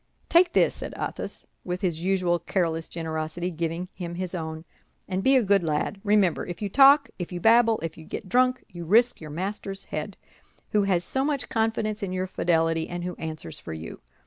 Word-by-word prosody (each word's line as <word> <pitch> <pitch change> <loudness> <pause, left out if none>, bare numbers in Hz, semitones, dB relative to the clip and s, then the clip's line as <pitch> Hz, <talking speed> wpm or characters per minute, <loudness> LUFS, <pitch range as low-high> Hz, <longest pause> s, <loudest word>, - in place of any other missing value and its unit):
"Take 345 +1 +5
this," - - +4
said - - -7
Athos, - - -4 0.2
with 180 0 -4
his 170 -3 -1
usual 180 -2 +2
careless 165 -4 -1
generosity, 160 +1 -3
giving 165 +2 -3
him 170 -2 -6
his 185 0 -4
own, 160 -2 -5 0.4
"and 185 0 -1
be 270 +1 +5
a 255 - +5
good 200 -1 +4
lad. 160 +5 -1
Remember, 205 -5 +3
if 175 -1 -6
you 205 - -2
talk, 275 +4 +6
if 175 - -4
you 175 - -4
babble, 225 +2 +5
if 165 0 -5
you 160 - -11
get 200 - -6
drunk, 255 +5 +2
you 175 -1 -8
risk 230 +7 +3
your 155 - -8
master's 195 +4 -4
head, - - -5 0.5
who 210 - +3
has 180 -3 +2
so 265 +7 -1
much 280 -4 -1
confidence 220 -1 0
in 190 -2 -3
your 185 0 -1
fidelity, 165 -3 +1
and 175 0 -4
who 180 0 -3
answers 155 - -6
for - - -7
you. 80 +1 -8
185 Hz, 200 wpm, -26 LUFS, 165-215 Hz, 0.5 s, talk